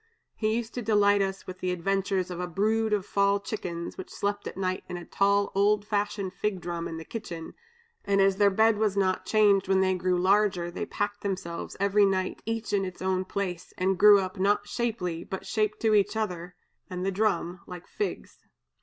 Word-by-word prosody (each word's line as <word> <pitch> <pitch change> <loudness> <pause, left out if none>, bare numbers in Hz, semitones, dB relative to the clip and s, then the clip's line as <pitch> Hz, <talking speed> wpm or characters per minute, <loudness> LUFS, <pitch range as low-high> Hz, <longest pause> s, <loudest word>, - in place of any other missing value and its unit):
He 215 0 0
used 235 -1 -3
to 245 - -3
delight 205 -2 +3
us 195 0 -2
with 185 0 -8
the 185 - -2
adventures 190 +1 -1
of 175 - -5
a 180 - -2
brood 215 +5 +1
of 205 -2 +1
fall 200 0 +2
chickens, 180 -6 -5
which 185 - -7
slept 205 0 -3
at - - -7
night 185 -1 -2
in 180 - -4
a 175 - -8
tall 200 0 +2
old 205 +1 +2
fashioned 205 -2 -2
fig 200 0 -2
drum 170 -1 -4
in 165 - -6
the 160 - -8
kitchen, 170 -8 -7 0.5
and 200 0 +1
as 195 0 +4
their 205 0 +5
bed 220 +2 +3
was 210 -2 +1
not 185 -1 +1
changed 205 -3 +4
when 190 0 +3
they 190 0 +2
grew 180 0 0
larger, 185 -2 +2
they - - -4
packed 205 0 -3
themselves 185 -4 -4
every 200 +1 +3
night 185 -1 -1
each 225 -1 -3
in 200 -1 +2
its 185 -1 -6
own 185 0 0
place, 185 -3 -4
and 185 0 0
grew 210 -1 +9
up, 185 0 -4
not 205 +1 +2
shapely, 215 -9 -2
but 190 - -6
shaped 215 -2 -1
to 220 -1 +3
each 205 +1 +3
other 180 -5 -3 0.3
and 180 0 -4
the 195 - +1
drum, 185 -3 0
like 180 -1 -9
figs! 415 - -5
195 Hz, 205 wpm, -27 LUFS, 185-210 Hz, 0.5 s, grew